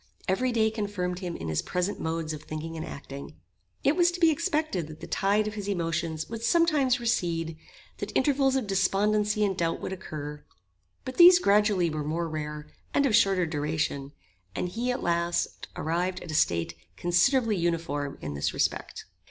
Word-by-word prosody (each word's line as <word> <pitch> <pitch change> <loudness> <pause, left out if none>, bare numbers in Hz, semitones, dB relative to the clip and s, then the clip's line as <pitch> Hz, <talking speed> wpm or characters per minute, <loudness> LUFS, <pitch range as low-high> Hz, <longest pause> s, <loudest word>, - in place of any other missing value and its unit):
Every 250 +7 +1
day 220 -2 +2
confirmed 200 -5 -3
him 175 -3 -4
in 80 - -6
his 80 -1 0
present 180 +3 -2
modes 160 -1 -2
of 150 - -7
thinking 155 +2 -6
and 160 - -4
acting. 140 -2 -8 0.5
It 280 - +3
was 350 0 +4
to 360 - -5
be 330 -2 +6
expected 295 - -1
that 155 0 -11
the - - -7
tide 205 +2 +1
of 215 - -4
his 205 -2 -5
emotions 165 -4 -2
would 230 0 -6
sometimes 285 -2 +3
recede, 170 -8 -1 0.4
that - - -4
intervals 270 -1 +3
of 265 -4 0
despondency 210 +2 +2
and 195 -2 0
doubt 165 -2 -1
would - - -4
occur; 150 -5 -7 0.6
but 255 - -6
these 350 +1 +10
gradually 205 - +3
were 155 -1 -3
more 165 +3 -2
rare, 150 -1 -5 0.3
and 285 - +4
of 235 -6 +3
shorter 195 -5 +4
duration; 150 -3 -2 0.4
and 180 - -2
he, 235 +7 -2
at 250 - -3
last, 170 0 -1
arrived 180 +3 -1
at 170 - -7
a - - -5
state 85 - +1 0.2
considerably 215 +7 +3
uniform 165 -5 -1
in 75 -1 -4
this 70 0 -2
respect. - - -2
180 Hz, 175 wpm, -27 LUFS, 160-220 Hz, 0.6 s, these